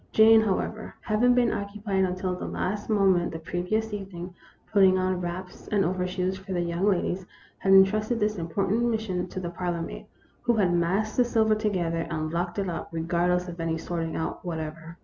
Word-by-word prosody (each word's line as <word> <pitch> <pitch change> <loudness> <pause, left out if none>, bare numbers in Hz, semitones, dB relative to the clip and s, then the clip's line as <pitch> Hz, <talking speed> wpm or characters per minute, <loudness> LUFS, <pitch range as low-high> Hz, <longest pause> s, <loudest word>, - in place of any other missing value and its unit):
Jane, 220 0 +7
however, 215 +1 -2
having 245 +3 +3
been 245 -2 +3
occupied 200 -1 -1
until 185 0 -2
the 180 - -5
last 205 +3 -3
moment 195 -5 +3
the 160 - -5
previous 180 +7 -2
evening, 190 -3 -6 0.4
putting 190 -2 +6
on 185 -1 0
wraps 180 +1 -6
and 200 -3 +2
overshoes 185 +1 -1
for 190 0 -6
the 175 - 0
young 170 +3 0
ladies, 185 -1 -1 0.3
had 195 - +1
en 195 0 +10
trusted 215 +4 -1
this 210 -1 0
important 195 +6 0
mission 200 -6 -2
to 185 - -6
the 175 -2 -4
parlor 175 -1 -2
maid, - - -8 0.3
who 240 -1 +2
had 190 -5 +2
massed 190 +6 0
the 250 - +6
silver 225 -2 +2
together, 180 -7 -1
and 155 -1 -3
locked 175 +1 -2
it 200 -1 -1
up, 170 - -4
regardless 175 +2 0
of 175 -1 -8
any 165 0 -1
sorting 165 -1 -3
out 160 - -3
whatever. 165 0 -6
185 Hz, 190 wpm, -27 LUFS, 175-210 Hz, 0.4 s, en